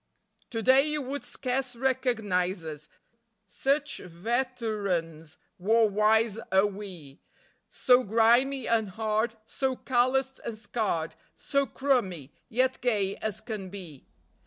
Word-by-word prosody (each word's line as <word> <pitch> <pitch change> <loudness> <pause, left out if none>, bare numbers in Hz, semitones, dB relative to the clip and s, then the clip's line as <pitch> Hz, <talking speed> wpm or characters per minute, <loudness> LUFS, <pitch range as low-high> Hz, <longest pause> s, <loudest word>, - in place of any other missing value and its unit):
_ - - -50
To 225 -2 -3
day 260 +3 +6
you 300 0 -1
would 280 +1 -4
scarce 255 -1 -2
recognise 220 -9 0
us, 150 -1 -7 0.6
Such 280 +8 -1
veterans 195 - -2 0.2
war 220 +4 +4
wise 215 +1 +2
are 190 +1 +5
we; 190 -9 -7 0.5
So 250 -1 +4
grimy 235 +5 +3
and 220 -3 +1
hard, 220 +3 -1
so 265 +2 -1
calloused 260 +1 +1
and 230 -2 -5
scarred, 205 -7 -2 0.2
So 280 -1 0
"crummy", 195 - -1 0.2
yet 260 +2 +1
gay 205 -5 +1
as 215 -3 -4
can 210 -5 -6
be. 180 -8 -10
220 Hz, 120 wpm, -28 LUFS, 190-255 Hz, 0.6 s, day